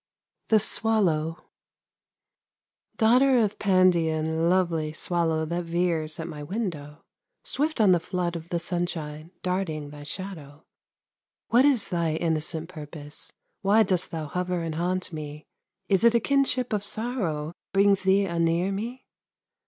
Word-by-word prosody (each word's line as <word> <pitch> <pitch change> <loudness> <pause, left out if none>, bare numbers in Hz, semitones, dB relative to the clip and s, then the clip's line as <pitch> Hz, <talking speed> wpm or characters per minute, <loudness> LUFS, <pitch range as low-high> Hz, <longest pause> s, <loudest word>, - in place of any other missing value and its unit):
THE 220 - +6
SWALLOW 180 -8 +1 1.6
Daughter 250 +4 +5
of 210 -3 +1
Pandion, 165 -4 +2
lovely 170 -4 +1
Swallow 160 -1 0
that 170 +2 -3
veers 165 -2 -1
at 165 - -4
my 150 -3 -7
window, 155 -4 -5 0.4
Swift 305 0 -1
on 210 -4 +6
the 175 - +4
flood 175 0 -2
of 165 0 -7
the 175 - 0
sunshine 165 -3 -4
Darting 165 -6 -2
thy 145 0 -10
shadow; 155 -2 -7 0.9
What 245 +4 +5
is 265 -7 +3
thy 170 -3 0
innocent 160 0 -1
purpose, 150 -3 -9 0.3
Why 210 +3 +5
dost 185 -4 0
thou 160 -2 -4
hover 180 +2 -2
and 165 -1 -3
haunt 180 +2 -2
me? 150 -1 -7 0.4
Is 195 0 +3
it 235 0 +5
a - - +5
kinship 265 -2 +1
of 205 -1 0
sorrow 200 -9 -2 0.2
Brings 195 0 +4
thee 190 +1 +3
anear 170 +1 +1
me? 235 +6 -5
175 Hz, 135 wpm, -26 LUFS, 160-200 Hz, 1.6 s, THE